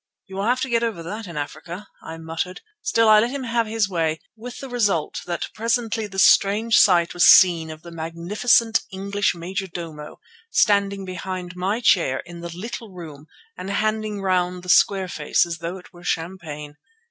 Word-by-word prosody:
"You 190 - -11
will 200 - -1
have 250 +3 +1
to 260 - -2
get 230 -1 +2
over 225 -8 -2
that 205 +5 -6
in 170 -3 -8
Africa," 170 +6 -6
I 160 - -8
muttered. 165 +3 -5 0.2
Still 230 -9 +2
I 215 -1 +7
let 230 +3 +1
him 275 +1 -4
have 230 -2 0
his 220 -1 0
way, 165 -4 -1 0.2
with 240 +2 -9
the 270 - -7
result 205 - 0
that 175 -1 -3
presently 230 -1 -1
the 195 -1 -10
strange 210 +4 +4
sight 175 -3 +4
was 175 - +2
seen 170 -4 +7
of 155 0 -10
the 170 - -10
magnificent 175 +8 +1
English 200 0 -1
majordomo 170 -4 -6 0.3
standing 200 - +2
behind 185 0 -6
my 195 +6 -1
chair 170 - +3
in 175 0 -10
the 170 0 -6
little 225 +2 -6
room 155 -5 -10 0.3
and 190 - -7
handing 215 0 -1
round 180 -1 0
the 180 - -9
square 190 +1 +4
face 155 -2 +1
as 170 -1 -5
though 170 +3 -5
it 185 - -16
were 175 0 -15
champagne. 160 -4 -5
190 Hz, 180 wpm, -22 LUFS, 170-215 Hz, 0.3 s, I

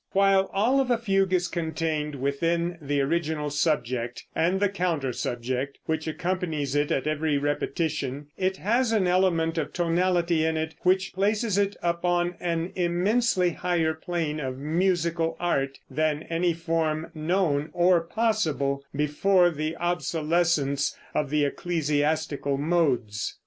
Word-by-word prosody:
While 195 0 +4
all 235 +8 +2
of 265 -2 +1
a 240 - +3
fugue 195 -4 +1
is 180 -1 +2
contained 160 -3 -2
within 165 +6 -1
the 145 -1 0
original 150 0 -1
subject, 125 -5 -1
and 180 +4 +2
the 205 - +3
counter 170 -9 -1
subject, 125 +4 -3
which 160 0 -2
accompanies 160 -3 -2
it 145 0 +1
at 135 - 0
every 155 -1 0
repetition, 145 -1 -2
it 190 0 -1
has 235 +4 +1
an 215 -4 +2
element 175 -3 +2
of 150 -1 -4
tonality 175 -1 +1
in 160 0 +1
it 160 0 -2
which 190 +1 +2
places 205 +2 +1
it 200 0 +1
upon 175 0 +1
an 170 0 -2
immensely 180 +2 +2
higher 165 -2 0
plane 160 -2 -3
of 130 -3 -4
musical 165 +2 0
art 140 -6 0
than 155 +2 -1
any 170 +1 0
form 165 -1 -1
known, 155 -2 0
or 175 0 +4
possible, 165 -9 0
before 175 +5 +3
the 155 +1 -3
obsolescence 160 -3 0 0.2
of 150 -2 0
the 150 0 +2
ecclesiastical 150 -2 -1
modes. 135 - 0
165 Hz, 135 wpm, -26 LUFS, 150-180 Hz, 0.2 s, While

